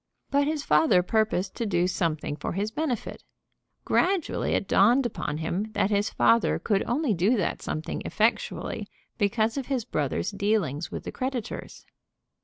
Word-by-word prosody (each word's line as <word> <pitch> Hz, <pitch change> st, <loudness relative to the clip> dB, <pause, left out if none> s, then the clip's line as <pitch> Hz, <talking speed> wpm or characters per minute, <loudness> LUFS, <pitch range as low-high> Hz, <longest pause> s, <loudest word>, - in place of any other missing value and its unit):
But 285 Hz, 0 st, +3 dB
his 305 Hz, -1 st, -1 dB
father 180 Hz, -, +4 dB
purposed 200 Hz, -2 st, 0 dB
to 230 Hz, -, -1 dB
do 175 Hz, -3 st, +2 dB
something 165 Hz, -5 st, -1 dB
for 150 Hz, -, -4 dB
his 205 Hz, +4 st, -2 dB
benefit. 260 Hz, -3 st, -3 dB, 0.6 s
Gradually 370 Hz, -3 st, +1 dB
it 195 Hz, -, 0 dB
dawned 240 Hz, +8 st, +4 dB
upon 150 Hz, -9 st, -3 dB
him 175 Hz, +7 st, -2 dB
that 200 Hz, -, +1 dB
his 205 Hz, 0 st, +2 dB
father 230 Hz, 0 st, +3 dB
could 200 Hz, -3 st, 0 dB
only 255 Hz, 0 st, +1 dB
do 200 Hz, +7 st, +2 dB
that 190 Hz, -, -1 dB
something 155 Hz, +1 st, -4 dB
effectually 220 Hz, +2 st, -1 dB, 0.3 s
because 220 Hz, +3 st, +1 dB
of 270 Hz, -, -3 dB
his 260 Hz, -5 st, -1 dB
brother's 150 Hz, -, -1 dB
dealings 200 Hz, -7 st, 0 dB
with -, -, -5 dB
the -, -, -5 dB
creditors. 255 Hz, -4 st, -5 dB
210 Hz, 155 wpm, -27 LUFS, 180-245 Hz, 0.6 s, father